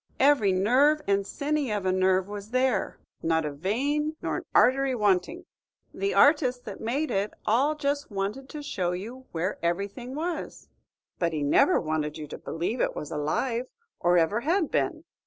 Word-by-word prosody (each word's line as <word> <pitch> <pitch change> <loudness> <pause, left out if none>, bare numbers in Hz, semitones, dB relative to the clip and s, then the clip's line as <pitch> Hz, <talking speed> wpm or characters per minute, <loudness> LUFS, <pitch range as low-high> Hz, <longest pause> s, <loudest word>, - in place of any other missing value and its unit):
Every 270 -8 +4
nerve 260 +11 +3
and 200 0 +1
siny 290 -2 -1
of 205 -3 -2
a 185 - +2
nerve 185 0 +2
was 205 0 -7
there, 255 -3 0 0.2
not 160 -1 +1
a 150 - -2
vein 280 - -1
nor - - -2
an - - -6
artery 265 0 +4
wanting. 210 - +1 0.5
The 395 +1 -1
artist 275 -4 +4
that - - -8
made 270 +8 -1
it 195 +2 -1
all 270 +8 +2
just 285 -1 -2
wanted 210 +7 -4
to 300 -1 -7
show 180 -10 -2
you 235 +8 -7
where 175 +4 -2
everything 200 +9 -3
was; 335 +3 -4 0.5
but 170 -2 0
he 150 -2 -1
never 145 - +4
wanted 155 -1 -2
you 155 - -6
to - - -7
believe 175 +9 -3
it - - 0
was 150 - -6
alive, 230 - -1 0.3
or 175 0 +3
ever 175 +6 +2
had 325 +5 0
been. - - 0
220 Hz, 175 wpm, -27 LUFS, 185-280 Hz, 0.5 s, Every